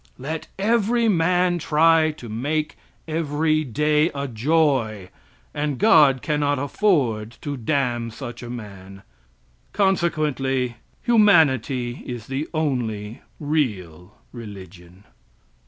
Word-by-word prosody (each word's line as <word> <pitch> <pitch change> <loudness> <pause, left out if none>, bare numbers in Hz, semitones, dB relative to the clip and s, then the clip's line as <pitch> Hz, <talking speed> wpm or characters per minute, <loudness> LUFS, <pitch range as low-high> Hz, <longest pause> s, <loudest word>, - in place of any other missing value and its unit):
Let 155 +5 -5
every 230 +3 +2
man 180 -1 +2
try 160 +1 +3
to 150 -6 -8
make 145 +8 -2 0.3
every 155 0 0
day 150 +4 +1
a 140 0 -3
joy, 120 - 0 0.4
and 145 -2 -2
God 150 - +5
cannot 145 -2 0
afford 130 - 0
to 145 -1 -4
damn 120 -2 -1
such 120 0 -8
a 120 - -8
man. 100 -4 -9 0.7
Consequently 150 - 0 0.3
humanity 140 - +3
is 120 -3 -6
the 135 +4 -4
only 120 -9 -2 0.2
real 105 - -3 0.2
religion. 95 -5 -11
140 Hz, 100 wpm, -22 LUFS, 115-160 Hz, 0.7 s, God